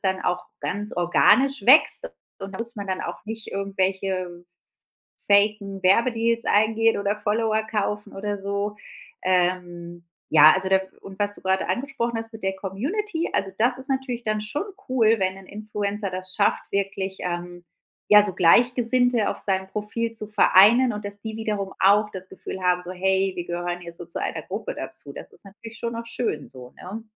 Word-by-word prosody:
dann 190 -1 -1
auch 180 0 -1
ganz 210 +2 -3
organisch 230 +8 +3
wächst 310 - +6 0.3
und 195 0 -7
da 190 - -7
muss 230 0 -3
man 200 -2 -6
dann 185 - -2
auch - - -7
nicht 225 0 -6
irgendwelche 190 -2 -2 0.8
faken 200 -1 +2
Werbedeals 230 +3 +2
eingehen 225 +2 +3
oder 200 +1 0
Follower 220 +1 0
kaufen 210 -1 -2
oder 205 +1 -3
so. 200 +1 -3 0.5
Ähm, 175 -2 -1 0.3
ja, 155 0 +8
also, 190 0 -1
da 190 - +6
w 190 - -7 0.2
und 195 0 -11
was 205 0 +1
du - - -11
gerade 190 0 0
angesprochen 245 -3 -2
hast 225 0 -8
mit 220 - -11
der 190 0 0
Community, 325 - -3
also, 195 - 0
das 245 +2 +2
ist 260 - -4
natürlich 260 -3 -2
dann 215 -1 -1
schon 290 - -3 0.2
cool, 230 -3 +3
wenn 190 0 0
'n 195 - -14
Influencer 210 -1 -4
das 185 0 -7
schafft, 205 - +2
wirklich, 195 -1 -2
ähm, 175 0 -5 0.5
ja, 210 0 +9
so 195 - 0
Gleichgesinnte 240 +4 +3
auf - - -6
seinem 190 -1 -1
Profil 220 +3 -3
zu 215 -2 -3
vereinen 220 +4 +5
und 210 0 -7
dass 200 0 -3
die 220 0 -6
wiederum 210 -3 -3
auch 205 +2 +5
das 190 -1 -6
Gefühl 190 - -7
haben, 180 0 +2
so: 180 - -8
„Hey, 190 +1 +1
wir 175 - -3
gehören 175 0 -4
jetzt 170 0 -8
so - - -9
zu - - -6
einer - - -3
Gruppe - - -5
dazu.“ - - -6
Das - - -10
ist - - -16
natürlich 220 +3 -12
schon 235 0 -4
auch 230 0 -6
schön 225 - -3
so, 125 -1 -13
ne? 210 +5 -7
200 Hz, 185 wpm, -24 LUFS, 190-225 Hz, 0.8 s, ja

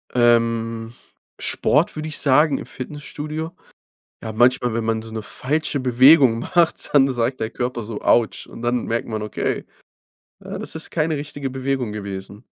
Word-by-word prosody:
Ähm, 115 -1 +2 0.4
Sport 150 +5 +1
würde 155 +1 -4
ich 155 - -4
sagen 145 +1 +4
im - - -8
Fitnessstudio. 150 +4 -6 0.7
Ja, 110 -1 -5
manchmal, 120 0 +3
wenn 115 -1 -1
man 110 0 0
so 110 0 -9
'ne 110 -1 -4
falsche 145 +6 -1
Bewegung 130 0 +6
macht, 170 +5 +1
dann 135 -1 +5
sagt 120 +2 -1
der 110 - -2
Körper 125 -1 -3
so, 105 0 -6
Autsch 115 -2 +2
und 115 - -11
dann 120 0 0
merkt 115 +1 -1
man, 110 -1 -3
okay, 105 - -2 0.8
ja - - -7
das - - -8
ist 160 - -6
keine 160 -1 0
richtige 145 -1 -5
Bewegung 130 -3 -2
gewesen. 100 +1 -7
125 Hz, 160 wpm, -22 LUFS, 115-145 Hz, 0.8 s, Bewegung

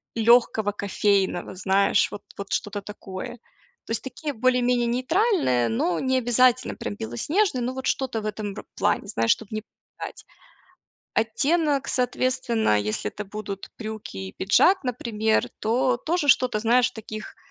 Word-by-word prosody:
лёгкого 225 -2 +4
кофейного, 200 -2 0
знаешь, 190 +2 +2
вот 205 - -7 0.2
вот 200 0 -7
что-то 205 0 -2
такое. 195 +2 -8 0.5
То - - -8
есть 225 0 -2
такие 290 +3 -5
более-менее 250 0 +2
нейтральные, 255 - +2
но 165 +10 0
не 260 0 +1
обязательно 250 +1 +3
прям 105 - -5
белоснежные, 260 - 0
но 250 +2 -2
вот 265 0 -6
что-то 255 -4 -1
в - - -8
этом 215 -1 -4
вот 195 - -8
ро - - -9
плане, - - 0
знаешь, 115 0 +1
чтоб 220 - -1
не 215 -1 -3 0.3
пугать. - - -7 0.9
Оттенок, 275 +6 +1
соответственно, 245 - +1
если 105 +1 -2
это 210 - -6
будут 200 -1 -7
брюки 220 - -7
и 95 -1 -6
пиджак, 350 - +4
например, 220 -3 0
то 245 +3 +2
тоже 320 +3 -1
что-то, 250 -4 +4
знаешь, 235 +3 +3
в - - -28
таких, 215 -1 -8
225 Hz, 150 wpm, -25 LUFS, 200-255 Hz, 0.9 s, лёгкого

